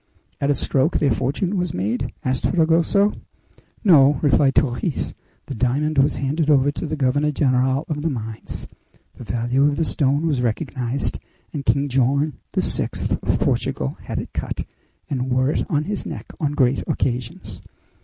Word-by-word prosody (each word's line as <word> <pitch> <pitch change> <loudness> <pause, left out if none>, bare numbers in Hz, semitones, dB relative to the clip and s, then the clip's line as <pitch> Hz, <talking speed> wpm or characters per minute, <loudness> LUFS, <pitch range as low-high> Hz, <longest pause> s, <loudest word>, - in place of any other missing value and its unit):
"At 140 - 0
a 145 - +3
stroke 135 +4 +1
their 140 - +2
fortune 175 - -1
was 180 -3 -2
made?" 120 +7 -1
asked 130 -1 0
Fragoso. 170 +4 +3 0.7
"No," 145 - +6
replied 140 -1 +4
Torres; 140 +4 0 0.3
"the - - -6
diamond 140 +6 +1
was 135 - +3
handed 145 +3 -1
over 145 -1 +4
to 160 - -4
the 155 - -2
governor 145 +1 +1
general 130 0 +1
of 150 -2 -3
the 165 - 0
mines. 110 -5 -5 0.5
The - - -11
value 120 +4 0
of 145 - +1
the 165 - 0
stone 145 +1 +1
was 145 -6 +1
recognized, 125 +2 -1 0.3
and 140 -3 -5
King 140 +1 +2
John 140 +3 +1 0.2
VI., - - 0 0.3
of - - 0
Portugal, 65 - -1
had - - -5
it - - -5
cut, - - -3 0.4
and 130 -1 -2
wore 130 +2 +2
it - - -1
on 150 0 +1
his 205 +5 -3
neck - - -6
on 145 -3 0
great 130 -2 +2
occasions. 125 -2 -3
140 Hz, 165 wpm, -22 LUFS, 130-150 Hz, 0.7 s, No